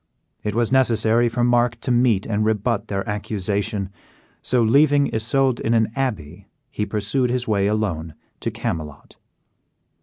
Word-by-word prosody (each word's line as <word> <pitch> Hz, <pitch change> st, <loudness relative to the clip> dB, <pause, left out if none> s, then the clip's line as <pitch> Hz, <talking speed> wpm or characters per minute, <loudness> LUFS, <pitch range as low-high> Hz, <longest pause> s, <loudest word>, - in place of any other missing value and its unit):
It 105 Hz, -1 st, -3 dB
was 120 Hz, 0 st, +1 dB
necessary 120 Hz, -2 st, +3 dB
for 120 Hz, +1 st, -1 dB
Mark 120 Hz, -1 st, +2 dB
to 125 Hz, -, -1 dB
meet 120 Hz, -5 st, +2 dB
and 110 Hz, -1 st, -1 dB
rebut 110 Hz, 0 st, 0 dB
their 95 Hz, -1 st, -3 dB
accusation; 105 Hz, -1 st, -2 dB, 0.5 s
so, 125 Hz, -2 st, +1 dB
leaving 140 Hz, +4 st, +3 dB
Isoude 125 Hz, +3 st, +1 dB
in 115 Hz, -, 0 dB
an 110 Hz, -1 st, +2 dB
abbey, 110 Hz, -, -4 dB, 0.2 s
he 105 Hz, -, -3 dB
pursued 110 Hz, +5 st, -1 dB
his 125 Hz, 0 st, -2 dB
way 100 Hz, -2 st, +1 dB
alone 95 Hz, -7 st, -2 dB, 0.2 s
to -, -, -2 dB
Camelot. 75 Hz, -3 st, -6 dB
110 Hz, 145 wpm, -22 LUFS, 105-120 Hz, 0.5 s, necessary